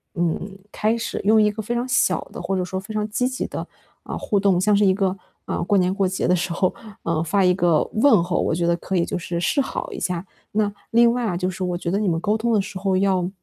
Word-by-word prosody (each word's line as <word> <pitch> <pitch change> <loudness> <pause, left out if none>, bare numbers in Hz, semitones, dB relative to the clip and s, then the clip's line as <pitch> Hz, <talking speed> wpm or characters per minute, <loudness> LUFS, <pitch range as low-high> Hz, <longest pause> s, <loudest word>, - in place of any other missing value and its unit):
嗯， 175 +3 -2
开 215 +2 +1
始 230 - -3
用 215 +2 +5
一 210 - +4
个 215 +1 -5
非 220 +3 -3
常 240 +1 -1
小 250 -1 +1
的 - - -6
或 195 - -2
者 185 - 0
说 190 +1 -4
非 205 +3 -8
常 210 0 -1
积 250 +4 0
极 255 0 -3
的， - - -6 0.4
嗯， - - -3
互 205 - 0
动， 195 -3 +3
像 210 +3 +3
是 205 0 +4
一 190 - +5
个， 190 -1 0 0.3
嗯， - - -2
过 200 +2 +3
年 185 0 +2
过 195 -1 +1
节 185 +1 -1
的 180 - +4
时 175 0 -2
候， 185 +1 +1 0.3
嗯， 165 -1 0
发 195 +4 +1
一 180 0 +4
个 175 -4 +3
问 235 -3 +5
候， 175 0 -1
我 - - 0
觉 170 +1 0
得 170 - +3
可 190 - -4
以 170 -2 +2
就 - - -3
是 170 -1 -3
示 230 - +1
好 485 - -4
一 395 - -6
下。 180 -1 -2 0.3
那 210 -1 0 0.2
另 235 0 +5
外 245 -1 -1
啊， 180 -5 -1
就 180 +1 -1
是 185 0 -5
我 180 -1 -1
觉 175 - -3
得 195 - +1
你 210 - 0
们 165 -2 +1
沟 210 +5 +1
通 235 +2 0
的 210 - +3
时 195 0 -7
候 190 -1 +1
要 185 -2 +1
195 Hz, 300 characters per minute, -22 LUFS, 180-215 Hz, 0.4 s, 用